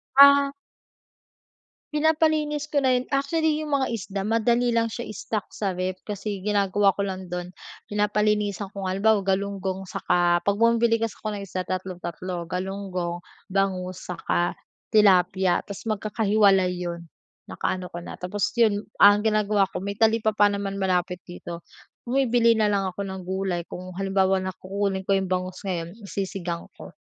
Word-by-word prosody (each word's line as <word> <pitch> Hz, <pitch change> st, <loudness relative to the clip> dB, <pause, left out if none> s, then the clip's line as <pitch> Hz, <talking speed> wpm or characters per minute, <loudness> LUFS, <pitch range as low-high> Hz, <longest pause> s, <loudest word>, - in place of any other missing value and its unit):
Ah. 280 Hz, 0 st, +8 dB, 1.4 s
Pinapalinis 305 Hz, -1 st, +2 dB
ko 285 Hz, -2 st, 0 dB
na 260 Hz, -, +4 dB
'yon. 255 Hz, -, -8 dB
Actually 310 Hz, +2 st, +1 dB
'yong 300 Hz, -, -6 dB
mga 275 Hz, -2 st, +2 dB
isda 200 Hz, -1 st, -4 dB
madali 235 Hz, +2 st, +2 dB
lang 230 Hz, -1 st, +1 dB
siya 235 Hz, +2 st, -5 dB
stock 215 Hz, -3 st, -3 dB
sa 200 Hz, -2 st, -1 dB
ref 185 Hz, 0 st, -2 dB
kasi 205 Hz, -2 st, -5 dB
ginagawa 200 Hz, -1 st, +3 dB
ko 195 Hz, -, -17 dB
lang 185 Hz, -2 st, -6 dB
do'n 180 Hz, 0 st, -3 dB, 0.4 s
pinapalinisan 210 Hz, -1 st, 0 dB
ko 200 Hz, -, -5 dB
nga. 185 Hz, -, -1 dB
Halimbawa 205 Hz, +2 st, +3 dB
galunggong 190 Hz, -1 st, -2 dB
saka 175 Hz, -1 st, +1 dB
'pag 200 Hz, 0 st, +1 dB
bumili 230 Hz, 0 st, +3 dB
kasi 225 Hz, -1 st, -2 dB
ako 215 Hz, -, -5 dB
ng -, -, -6 dB
isda 185 Hz, 0 st, -3 dB
tatlo-tatlo, 180 Hz, -1 st, -4 dB
galunggong, 180 Hz, -1 st, -4 dB, 0.2 s
bangus, 185 Hz, -2 st, -1 dB
saka 175 Hz, 0 st, -1 dB, 0.4 s
tilapia. 190 Hz, -3 st, +4 dB
'Tas 200 Hz, +2 st, -8 dB
magkakahiwalay 205 Hz, -3 st, +2 dB
'yon. 170 Hz, -1 st, -5 dB, 0.4 s
Naka-ano 185 Hz, -1 st, -3 dB
ko 175 Hz, 0 st, -8 dB
na, -, -, -9 dB
tapos 195 Hz, +3 st, -1 dB
'yon, 210 Hz, -3 st, +3 dB, 0.2 s
ang 205 Hz, +1 st, +7 dB
ginagawa 215 Hz, -2 st, +2 dB
ko -, -, -4 dB
may 200 Hz, +2 st, -4 dB
talipapa 220 Hz, -1 st, +3 dB
naman 200 Hz, -1 st, -3 dB
malapit 180 Hz, -2 st, -1 dB
dito. 175 Hz, -1 st, -8 dB, 0.4 s
Bumibili 245 Hz, -2 st, +3 dB
na 215 Hz, -, +4 dB
lang 200 Hz, -1 st, +1 dB
ako 180 Hz, -, -15 dB
ng 190 Hz, -1 st, -6 dB
gulay 185 Hz, -1 st, -2 dB
kung 180 Hz, +1 st, -9 dB
halimbawa 190 Hz, 0 st, +1 dB
na 185 Hz, -, -2 dB
kukunin 195 Hz, 0 st, -2 dB
ko 195 Hz, -, +4 dB
'yong 190 Hz, -1 st, -1 dB
bangus 185 Hz, +1 st, -2 dB
ngayon, 175 Hz, -2 st, -4 dB
isisigang 190 Hz, -4 st, -4 dB
ko -, -, -11 dB
195 Hz, 155 wpm, -25 LUFS, 185-220 Hz, 1.4 s, Ah